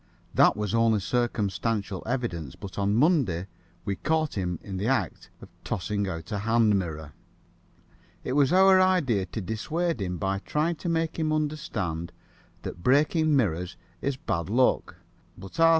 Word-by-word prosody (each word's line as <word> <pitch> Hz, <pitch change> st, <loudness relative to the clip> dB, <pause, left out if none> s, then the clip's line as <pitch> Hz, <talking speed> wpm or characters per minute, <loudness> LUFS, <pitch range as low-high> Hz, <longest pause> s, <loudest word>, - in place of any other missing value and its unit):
That -, -, +5 dB
was 105 Hz, 0 st, -2 dB
only 115 Hz, -2 st, +3 dB
circumstantial 105 Hz, -1 st, -1 dB
evidence, 90 Hz, -, -3 dB
but 100 Hz, -1 st, -8 dB
on 100 Hz, +1 st, +1 dB
Monday 125 Hz, -, +2 dB, 0.4 s
we 100 Hz, -1 st, -2 dB
caught 155 Hz, -1 st, 0 dB
him 90 Hz, -3 st, -2 dB
in 95 Hz, -2 st, -5 dB
the 100 Hz, +4 st, -1 dB
act 135 Hz, +1 st, -1 dB
of -, -, -12 dB
tossing 100 Hz, +3 st, -2 dB
out 85 Hz, +1 st, -6 dB
a 105 Hz, -, -1 dB
hand 115 Hz, 0 st, +3 dB
mirror. 80 Hz, -4 st, -6 dB, 1.1 s
It 130 Hz, -, -2 dB
was 140 Hz, -1 st, +3 dB
our 190 Hz, +1 st, +6 dB
idea 140 Hz, -, +2 dB
to 95 Hz, +5 st, -5 dB
dissuade 155 Hz, -, -2 dB
him 90 Hz, -2 st, -2 dB
by 95 Hz, +2 st, -1 dB
trying 155 Hz, +9 st, -1 dB
to 170 Hz, -, -4 dB
make 165 Hz, 0 st, -1 dB
him 155 Hz, -1 st, 0 dB
understand 105 Hz, -, -2 dB, 0.5 s
that 85 Hz, -, -6 dB
breaking 150 Hz, -, +3 dB
mirrors 90 Hz, -, 0 dB, 0.2 s
is 140 Hz, -1 st, -1 dB
bad 85 Hz, -8 st, -2 dB
luck, 125 Hz, +4 st, +2 dB, 0.4 s
but 95 Hz, -, -10 dB
R. 165 Hz, 0 st, +7 dB
110 Hz, 155 wpm, -27 LUFS, 95-150 Hz, 1.1 s, R